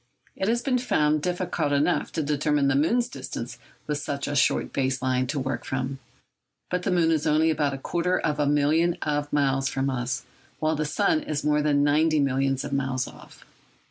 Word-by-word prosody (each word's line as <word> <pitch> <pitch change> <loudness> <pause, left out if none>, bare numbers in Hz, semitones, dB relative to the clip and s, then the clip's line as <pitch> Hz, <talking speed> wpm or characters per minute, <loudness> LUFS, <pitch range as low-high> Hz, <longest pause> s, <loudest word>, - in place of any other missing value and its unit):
It 190 - -2
had 235 +2 +1
been 255 -2 +1
found 150 -10 +1
difficult 175 -3 -1
enough 145 +5 +1
to 160 - -1
determine 145 -1 +1
the 135 - +2
moon's 235 - +2
distance - - -7 0.3
with 150 -1 -2
such 140 -1 -4
a 145 - -2
short 140 - +2
base 130 -1 0
line 130 0 0
to 145 +2 -2
work 130 -2 -3
from. 135 +1 -3 0.7
But 180 0 0
the - - -2
moon 170 -2 +3
is 160 -1 +1
only 155 +1 +3
about 145 -3 0
a - - -6
quarter 175 +6 0
of 150 0 -1
a 145 - +2
million 155 +4 +2
of 145 -1 -1
miles 135 -2 +1
from 135 0 -1
us, 125 -1 -2 0.4
while 155 0 +1
the 155 0 -1
sun 205 - +1
is 150 - -3
more 150 0 +2
than 145 -1 +2
ninety 155 +2 +3
millions 135 -1 +1
of 145 - -5
miles 135 -2 -1
off. - - -14
145 Hz, 200 wpm, -25 LUFS, 135-160 Hz, 0.7 s, moon